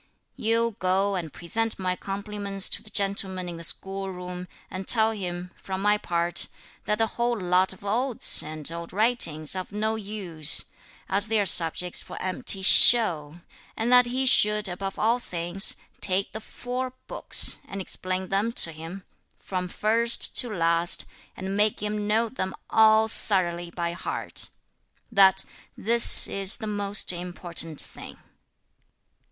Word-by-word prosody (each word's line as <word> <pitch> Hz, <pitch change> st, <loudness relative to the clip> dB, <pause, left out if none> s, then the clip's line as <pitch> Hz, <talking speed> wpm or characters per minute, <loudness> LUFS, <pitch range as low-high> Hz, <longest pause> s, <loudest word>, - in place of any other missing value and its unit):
You 230 Hz, 0 st, -1 dB
go 190 Hz, +2 st, 0 dB
and 170 Hz, -5 st, -5 dB
present 225 Hz, +9 st, -3 dB
my 185 Hz, -1 st, -2 dB
compliments 200 Hz, 0 st, -2 dB
to -, -, -2 dB
the 215 Hz, -, -8 dB
gentleman 195 Hz, -3 st, -2 dB
in 170 Hz, -1 st, -7 dB
the 165 Hz, -, -10 dB
schoolroom, 180 Hz, -1 st, -5 dB, 0.2 s
and 185 Hz, 0 st, -7 dB
tell 220 Hz, -1 st, +3 dB
him, 180 Hz, -4 st, -7 dB
from 190 Hz, -1 st, -7 dB
my 210 Hz, +1 st, +1 dB
part, 170 Hz, -2 st, -3 dB, 0.4 s
that 210 Hz, +1 st, -1 dB
the 225 Hz, -, +1 dB
whole 235 Hz, +1 st, -3 dB
lot 185 Hz, 0 st, +1 dB
of 190 Hz, +1 st, -12 dB
Odes 240 Hz, +4 st, +1 dB
and 155 Hz, 0 st, -5 dB
old 170 Hz, 0 st, -8 dB
writings 190 Hz, -8 st, +1 dB
are -, -, -3 dB
of 185 Hz, -, -9 dB
no 215 Hz, +2 st, -2 dB
use, 190 Hz, -7 st, 0 dB, 0.4 s
as 200 Hz, +2 st, 0 dB
they 220 Hz, -1 st, 0 dB
are 205 Hz, -, 0 dB
subjects 175 Hz, 0 st, +2 dB
for -, -, -10 dB
empty 190 Hz, +1 st, -1 dB
show; 175 Hz, -8 st, +5 dB, 0.4 s
and 225 Hz, +2 st, -2 dB
that 250 Hz, -1 st, +5 dB
he 260 Hz, +2 st, -1 dB
should, 210 Hz, -4 st, +6 dB
above 195 Hz, +2 st, -6 dB
all 230 Hz, +3 st, +1 dB
things, 175 Hz, -2 st, 0 dB, 0.2 s
take 195 Hz, 0 st, -2 dB
the 220 Hz, -, -7 dB
Four 250 Hz, +3 st, -6 dB
Books, -, -, +1 dB
and 195 Hz, -, -7 dB
explain 185 Hz, 0 st, -4 dB
them 200 Hz, +4 st, -1 dB
to 170 Hz, -, +3 dB
him, 165 Hz, +5 st, -10 dB, 0.4 s
from 185 Hz, -1 st, -5 dB
first 230 Hz, +5 st, +2 dB
to 245 Hz, -, +3 dB
last, 170 Hz, -2 st, +1 dB, 0.3 s
and 190 Hz, +1 st, -5 dB
make 210 Hz, +1 st, +1 dB
him 210 Hz, 0 st, -4 dB
know 225 Hz, +2 st, +1 dB
them 200 Hz, -5 st, -6 dB, 0.2 s
all 220 Hz, 0 st, +4 dB
thoroughly 175 Hz, -5 st, -3 dB
by 170 Hz, 0 st, -4 dB
heart, 170 Hz, -, -6 dB, 0.6 s
that 190 Hz, -3 st, +4 dB, 0.3 s
this 235 Hz, +2 st, +8 dB
is 195 Hz, +1 st, +2 dB
the 225 Hz, -, -7 dB
most 205 Hz, -2 st, 0 dB
important 175 Hz, -3 st, -7 dB
thing!" -, -, -2 dB
195 Hz, 150 wpm, -24 LUFS, 180-215 Hz, 0.6 s, this